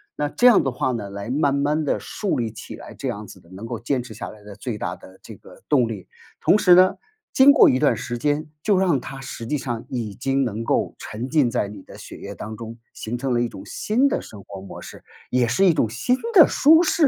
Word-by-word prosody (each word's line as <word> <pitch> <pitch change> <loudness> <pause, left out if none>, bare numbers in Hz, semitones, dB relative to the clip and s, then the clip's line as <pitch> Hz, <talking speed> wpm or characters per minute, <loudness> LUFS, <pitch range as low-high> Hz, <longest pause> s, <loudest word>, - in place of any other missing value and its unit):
那 150 - -1
这 240 - 0
样 240 - +6
的 135 - -1
话 130 +1 -1
呢， 110 -5 -4
来 100 +2 -7
慢 140 +1 +1
慢 145 +2 0
地 - - 0
树 200 -9 -3
立 115 -2 -2
起 110 - -9
来， - - -11
这 - - -6
样 - - -4
子 - - -13
的 85 - -22
能 95 +4 -9
够 115 -1 -5
坚 125 +3 -1
持 120 -3 -10
下 110 - -7
来 105 -1 -14
的 105 -1 -11
最 110 +2 -5
大 - - -4
的 95 - -16
这 - - -10
个 - - -17
动 130 -6 +3
力。 105 -5 -7 0.3
同 - - +4
时 180 -4 +6
呢， 185 +1 +5 0.4
经 265 +2 +7
过 290 - +7
一 130 - +2
段 145 - +3
时 120 - -5
间 145 +5 -1 0.2
就 205 -3 +3
让 180 -7 +2
它 135 +2 -8
实 135 -3 -7
际 150 - 0
上 120 -3 -5
已 115 -5 -4
经 135 +4 0
能 115 -2 -3
够 - - 0
沉 115 +5 -6
浸 145 -5 +3
在 115 -4 0
你 100 -1 -10
的 - - -13
血 - - -10
液 100 - -8
当 110 +2 -7
中， 115 0 -8 0.2
形 115 +3 -5
成 130 +1 -2
了 120 - +1
一 120 - -1
种 95 - -11
新 245 +6 +1
的 - - -1
生 105 - -12
活 100 -1 -10
模 95 - -10
式， - - -11 0.3
也 125 -1 +2
是 125 +12 +2
一 180 - +5
种 115 - +1
新 130 - 0 0.2
的 345 -8 +8
舒 320 +4 +5
适 320 -2 +3
125 Hz, 280 characters per minute, -22 LUFS, 110-150 Hz, 0.4 s, 的